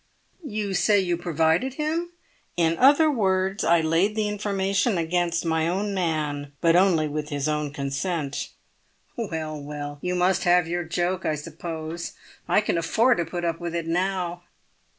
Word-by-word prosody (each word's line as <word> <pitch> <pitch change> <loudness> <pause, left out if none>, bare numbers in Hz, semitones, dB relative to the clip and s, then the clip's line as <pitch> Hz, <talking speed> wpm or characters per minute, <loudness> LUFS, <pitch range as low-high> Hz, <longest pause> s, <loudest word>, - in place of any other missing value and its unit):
"You 210 -7 -3
say 205 +2 +4
you 175 -2 0
provided 170 - +1
him?" 320 +3 -1 0.5
"In 165 -1 +3
other 295 +4 +6
words, 190 -4 +1
I 170 0 +4
laid 165 +6 +2
the 215 -1 0
information 200 0 0
against 170 0 0
my 160 0 +1
own 200 +4 -1
man, 150 -5 -2
but 165 -1 +4
only 175 -4 +4
with 150 0 -4
his 145 -1 -2
own 150 -1 -1
consent." 140 +2 -3 0.7
"Well, 160 -9 -4
well, 145 0 -6
you 180 0 -1
must 180 +1 +2
have 175 -1 +4
your 175 +1 -2
joke, 175 +3 -1
I 155 - 0
suppose. 160 +2 -6 0.3
I - - +4
can 190 -5 0
afford 225 +9 +3
to 170 - 0
put 175 +1 -4
up 165 -1 -1
with 170 -1 -4
it 170 -1 -2
now." 175 0 -1
175 Hz, 160 wpm, -25 LUFS, 160-195 Hz, 0.7 s, other